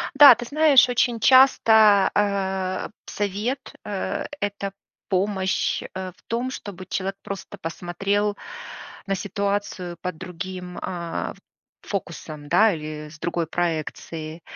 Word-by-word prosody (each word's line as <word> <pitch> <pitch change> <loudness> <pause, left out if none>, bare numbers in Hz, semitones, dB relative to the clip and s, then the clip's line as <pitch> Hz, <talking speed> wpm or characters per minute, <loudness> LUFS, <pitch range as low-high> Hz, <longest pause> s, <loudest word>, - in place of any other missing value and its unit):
Да, 280 -3 +10
ты 240 +1 -6
знаешь, 285 -2 +5
очень 245 -1 +1
часто, 220 -4 +6
э, 190 -2 0 0.2
совет, 210 +7 -3
э- 200 -2 -3 0.2
это 200 -1 -2 0.4
помощь, 190 0 0
э, 185 0 -5
в - - -27
том, 240 +3 -1
чтобы 190 -7 -8
человек 195 +1 -3
просто 200 -2 -7
посмотрел 195 +5 -1 0.7
на 195 - +1
ситуацию 200 -3 -2
под 180 -3 -4
другим, 180 0 -7
а, 170 -2 -4 0.5
фокусом, 155 -6 -6
да. 210 +6 +5
Или 150 -1 -6
с 155 0 -14
другой 170 0 -2
проекцией. 160 -1 -3
195 Hz, 115 wpm, -24 LUFS, 175-210 Hz, 0.7 s, Да